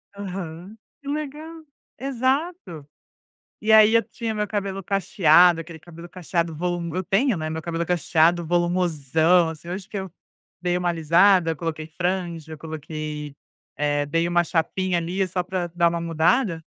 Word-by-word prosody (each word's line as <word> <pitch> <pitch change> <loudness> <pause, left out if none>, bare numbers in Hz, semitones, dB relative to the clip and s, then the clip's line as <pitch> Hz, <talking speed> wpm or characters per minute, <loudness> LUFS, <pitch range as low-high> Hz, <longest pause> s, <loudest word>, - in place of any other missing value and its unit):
Aham. 190 0 -7 0.2
Que 280 - -14
legal. 305 +3 -5 0.4
Exato. 260 - -2 0.7
E 220 0 +1
aí 220 0 +7
eu 230 - +4
tinha 230 -2 -5
o - - -6
meu 210 0 -1
cabelo 195 -2 -3
cacheado, 175 -3 +4
aquele 165 0 -11
cabelo 170 +1 -12
cacheado 170 -2 -2
volu 175 0 -3
eu 185 - -1
tenho, 210 +4 +1
né, 155 0 -3
meu 160 0 -4
cabelo 170 +1 -3
é - - -7
cacheado, 170 0 +2
volumosão, 170 -1 +2
assim, 160 +1 -9
hoje 190 +2 -5
que 210 - -6
eu 190 -2 -5 0.5
dei 180 0 0
uma 180 -1 0
alisada, 170 +2 +4
eu - - -4
coloquei 155 -1 -5
franja, 170 -2 -3
eu - - -9
coloquei, 155 -2 -6 0.4
eh, 145 0 0
dei 165 +4 0
uma 175 0 +2
chapinha, 180 +2 -1
ali, 180 +3 -1
só 180 0 -2
para 180 -1 -3
dar 170 -1 +4
uma 170 0 -3
mudada. 165 +3 +1
175 Hz, 165 wpm, -23 LUFS, 160-195 Hz, 0.7 s, aí